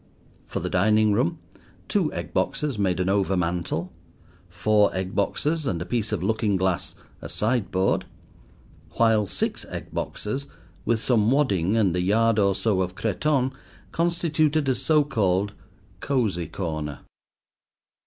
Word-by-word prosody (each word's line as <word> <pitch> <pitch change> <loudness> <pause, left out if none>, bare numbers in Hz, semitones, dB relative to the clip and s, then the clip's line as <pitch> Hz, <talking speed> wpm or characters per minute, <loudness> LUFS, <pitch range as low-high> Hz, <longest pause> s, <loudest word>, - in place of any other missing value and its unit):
For - - -4
the - - -2
dining 105 +3 +3
room 85 -4 +1 0.5
two - - +1
egg - - -6
boxes 145 -8 -1
made 95 -3 +1
an 90 - 0
overmantel; 90 -3 0 0.6
four 105 +4 +3
egg 95 0 -3
boxes 150 +9 0
and 85 - -1
a 85 - -4
piece 110 +3 -1
of 100 -5 -1
looking 110 0 +1
glass 95 -2 -1 0.3
a - - -7
sideboard; 105 -4 0 0.9
while 110 -3 +3
six - - -2
egg - - -7
boxes, 135 +7 -3 0.4
with 115 -1 +2
some 115 -4 +3
wadding 110 - +2
and 95 -6 +2
a 90 - +1
yard 110 +4 +3
or 100 -1 +3
so 100 -2 +1
of 90 0 -3
cretonne, 130 +6 0 0.4
constituted 160 -3 +1
a 130 - +3
so 150 +3 +3
called 105 -7 0 0.5
"cosy 105 - 0
corner." 80 -4 -4
105 Hz, 135 wpm, -25 LUFS, 95-125 Hz, 0.9 s, dining